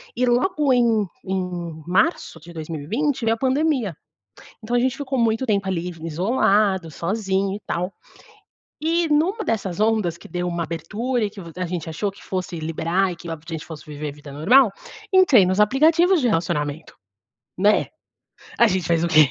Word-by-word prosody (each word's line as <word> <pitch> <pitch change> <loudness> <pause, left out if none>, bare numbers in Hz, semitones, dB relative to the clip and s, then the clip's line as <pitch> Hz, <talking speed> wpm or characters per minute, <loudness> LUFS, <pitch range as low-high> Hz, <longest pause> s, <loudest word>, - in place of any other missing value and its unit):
e 250 +2 +1
logo 270 +4 +2
em 230 -4 +3 0.2
em 180 -4 -4
março 185 - +1
de 170 +3 -13
2020 165 - -2
veio 225 0 +3
a - - -14
pandemia. 265 - +1 0.7
Então 235 +3 -2
a - - +4
gente 260 +2 0
ficou 270 -2 -3
muito 230 +2 +1
tempo 200 -4 0
ali 180 -1 -2
v 165 -1 -10
isolado, 190 0 +1
sozinho 195 +3 -1
e 210 - -8
tal. 180 +3 -2 0.9
E 330 +1 +1
numa 350 +9 +2
dessas 200 - -2
ondas 215 -6 +1
que - - -13
deu 180 0 -2
uma 170 -1 -2
abertura 215 +9 -2
e - - -2
que 200 -1 -11
v 170 -2 -10
a 185 - -1
gente 170 -2 -4
achou 160 +6 -2
que 195 - -17
fosse 185 -2 -4
liberar 165 +4 0
e - - -6
que 170 - -10
logo 165 -2 -5
a - - -8
gente 160 -2 -5
fosse 160 -3 -10
viver 150 0 -5
a - - -8
vida 145 -1 -12
normal, 210 - +5 0.4
entrei 295 - +6
nos 185 +2 0
aplicativos 320 - +4
de 250 - +2
relacionamento. 160 -4 -2 0.6
Né? 205 +3 +3 0.7
A 235 - +7
gente 185 -4 -1
faz 165 -1 +2
o 170 - +1
quê? 155 -6 +6
195 Hz, 185 wpm, -22 LUFS, 170-245 Hz, 0.9 s, A